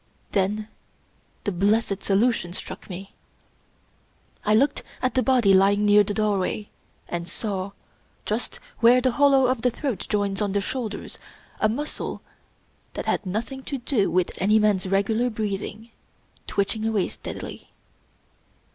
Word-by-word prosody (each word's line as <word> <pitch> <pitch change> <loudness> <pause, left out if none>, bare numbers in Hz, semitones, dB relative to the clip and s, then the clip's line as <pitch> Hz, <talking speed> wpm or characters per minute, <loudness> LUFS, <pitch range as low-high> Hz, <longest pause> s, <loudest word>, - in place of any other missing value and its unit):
Then 210 +2 0 0.8
the 205 - 0
blessed 200 +2 +1
solution 200 -3 +1
struck - - -7
me. 195 +1 -8 1.3
I 210 0 +3
looked 275 +6 +3 0.2
at 255 - 0
the 260 - +3
body 250 -7 +4
lying 200 +2 +4
near 205 0 +7
the 205 0 -3
doorway, 210 0 0 0.4
and 170 0 -4
saw, 195 0 -4 0.5
just - - -2 0.2
where 240 +2 +7
the 255 0 +2
hollow 275 +1 +5
of 255 -2 +1
the 250 - +3
throat 250 -2 -3
joins 205 -1 0
on 200 -2 0
the 200 - +2
shoulders, 220 -1 -4 0.4
a 215 - +3
muscle 290 +7 -4 0.7
that - - -4
had - - 0
nothing 230 +8 -3
to 280 - -3
do 245 -5 +1
with 180 0 +1
any 210 +3 +4
man's 210 -3 +2
regular 220 +5 +2
breathing, 215 +1 -4 0.6
twitching 205 +2 -1
away 215 -4 +1
steadily. - - -8
210 Hz, 140 wpm, -25 LUFS, 195-235 Hz, 1.3 s, near